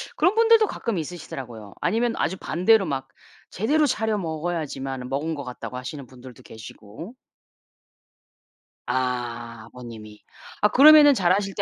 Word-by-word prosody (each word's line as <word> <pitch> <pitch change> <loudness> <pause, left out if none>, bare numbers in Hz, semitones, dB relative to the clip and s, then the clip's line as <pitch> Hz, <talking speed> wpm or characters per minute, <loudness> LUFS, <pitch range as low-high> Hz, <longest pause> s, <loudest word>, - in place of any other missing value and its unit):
그런 360 +7 +2
분들도 455 -1 +5
가끔 230 -5 -4
있으시더라고요. 130 - -8
아니면 230 +1 0
아주 190 - -1
반대로 195 +5 +2
막 135 -3 -4 0.4
제대로 295 - +1
차려 220 -4 -1
먹어야지만은 155 -6 -4
먹은 150 +4 -2
것 140 - -6
같다고 125 0 -8
하시는 135 +2 -7
분들도 125 -1 -14
계시고. 110 - -12 1.7
아. 120 -2 -3
아버님이. 110 -4 -12 0.4
아 210 - +4
그러면은 295 +2 +8
자라실 195 -1 +1
때 - - -1
155 Hz, 325 characters per minute, -23 LUFS, -, 1.7 s, 그러면은